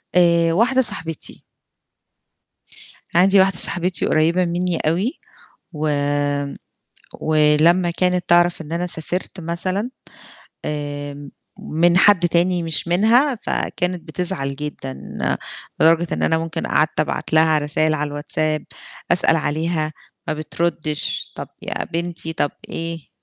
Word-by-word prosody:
آآ 170 -2 +4
واحدة 250 +7 +3
صاحبتي. 165 - -4 1.7
عندي 190 +2 +6
واحدة 190 -1 +3
صاحبتي 180 +1 +1
قريّبة 170 +4 +2
منّي 175 0 -1
أوي 185 - -1 0.5
وامم، 145 -2 -1 0.7
ولمّا 155 +3 +3
كانت 180 0 0
تعرف 175 0 +4
إن 160 0 -10
أنا 175 +1 -1
سافرت 175 +3 -3
مثلًا 185 +6 -2 0.8
آآ 145 -1 -4
م 145 -1 -10 0.4
من 170 +2 +4
حد 185 -3 +5
تاني 175 +1 +2
مش 165 +1 -3
منها 235 +10 +4
فكانت 180 -1 -1
بتزعل 155 -5 -2
جدًا، 145 -2 -5 0.9
لدرجة 165 +2 +4
إن - - -3
أنا 160 - +2
ممكن 165 0 -4
قعدت 155 0 +2
أبعت 155 - -2
لها 160 0 +5
رسايل 155 +1 +1
على 150 -1 -2
الWhatsApp، 155 +1 -1 0.5
أسأل 175 -2 +4
عليها، 155 0 -1 0.4
ما 155 - +1
بتردّش، 155 -1 -2
طب - - -6
يا - - -3
بنتي، 170 -1 -4
طب 145 - 0 0.2
إيه؟ 165 -2 -5
165 Hz, 120 wpm, -20 LUFS, 155-180 Hz, 1.7 s, عندي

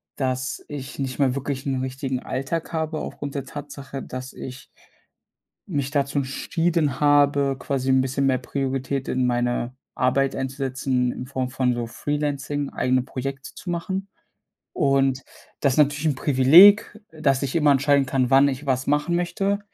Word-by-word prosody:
dass 130 -1 -2
ich 145 -1 -7
nicht 130 0 -3
mehr 135 -2 +2
wirklich 140 -1 -4
'n 135 -1 -1
richtigen 130 0 -3
Alltag 160 +6 -3
habe 160 -1 -2
aufgrund 145 -1 -6
der 140 -1 -3
Tatsache, 140 -1 -8
dass 130 +1 -7
ich 130 0 -9 1.0
mich 140 -7 -2
dazu 140 -1 0
entschieden 150 +2 -1
habe, 145 -1 +3
quasi 135 -2 -2
'n 130 0 +4
bisschen 135 +1 -1
mehr 130 -2 +2
Priorität 135 +1 -3
in 125 -1 +1
meine 120 0 -1 0.2
Arbeit 135 +1 +1
einzusetzen, 130 -1 -1
in 125 - -7
Form 130 -1 -3
von 125 -1 0
so 120 -1 -2
freelancing, 145 +2 -2
eigene 130 0 +1
Projekte 135 +1 -6
zu 180 - -9
machen. 190 +3 -3 0.7
Und 135 -1 +2 0.4
das 140 -2 +2
ist - - -4
natürlich 145 +1 +3
'n 145 - +1
Privileg, 165 +12 +6
äh, 155 -1 -13
dass 140 -2 +2
ich 135 +2 -3
immer 150 -3 +4
entscheiden 140 0 +3
kann, 130 -1 +1
wann 135 +1 +6
ich 140 +1 -3
was 130 -1 0
machen 150 +4 +1
möchte 195 +3 0
135 Hz, 160 wpm, -23 LUFS, 130-145 Hz, 1.0 s, Privileg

